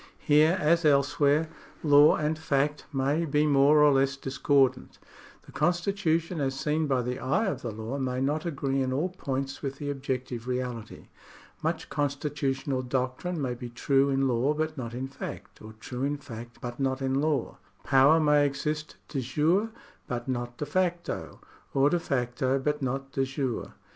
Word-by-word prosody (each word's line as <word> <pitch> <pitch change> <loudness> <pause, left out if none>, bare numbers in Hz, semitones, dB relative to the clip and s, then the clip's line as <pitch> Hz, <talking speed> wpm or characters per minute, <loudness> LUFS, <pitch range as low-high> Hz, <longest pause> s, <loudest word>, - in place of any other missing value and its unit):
Here, 155 +4 +4
as 170 +1 +3
elsewhere, 145 +1 +3 0.4
law 145 -1 +7
and 155 +1 0
fact 150 -1 -1
may 140 +4 +1
be 150 -1 +2
more 145 +1 +5
or 145 -1 +6
less 135 0 +2
discordant. 135 -1 +1 0.5
The - - -15
constitution 175 -2 0
as 135 -1 -1
seen 155 +1 0
by 130 -3 +1
the 125 +1 -3
eye 185 +13 +1
of 195 - -2
the 120 - -4
law 110 +5 -5
may 130 -1 -1
not 145 +4 0
agree 140 -5 -1
in 130 -1 -1
all 150 +8 0
points 135 -6 -4
with 135 -1 -4
the 145 0 -3
objec 130 -2 -3
tive 120 -1 -7
reality. 125 -3 -4 0.5
Much - - -2
constitutional 140 -2 -1
doctrine 130 +7 -2
may 130 -4 -1
be 120 0 -7
true 135 +3 +2
in 135 0 +2
law 130 +4 +1
but 155 0 -2
not 120 -4 -6
in 130 +2 -3
fact, 135 - -8
or 110 0 -10
true 125 +3 -7
in 145 +2 0
fact 120 -4 -10
but 120 -1 -6
not 135 -1 0
in 135 +1 +1
law. 150 -2 -1 0.2
Power 135 +4 +5
may 150 -2 +4
exist 150 +2 -3
dejure 155 - +1 0.4
but 120 0 -4
not 120 -1 -3
de 150 - -3
facto, 175 +2 -2 0.4
or 140 +2 +4
de 175 - +2
facto 130 -2 0
but 150 +2 -1
not 135 +1 -3
dejure. 135 -2 -2
140 Hz, 170 wpm, -28 LUFS, 130-150 Hz, 0.5 s, law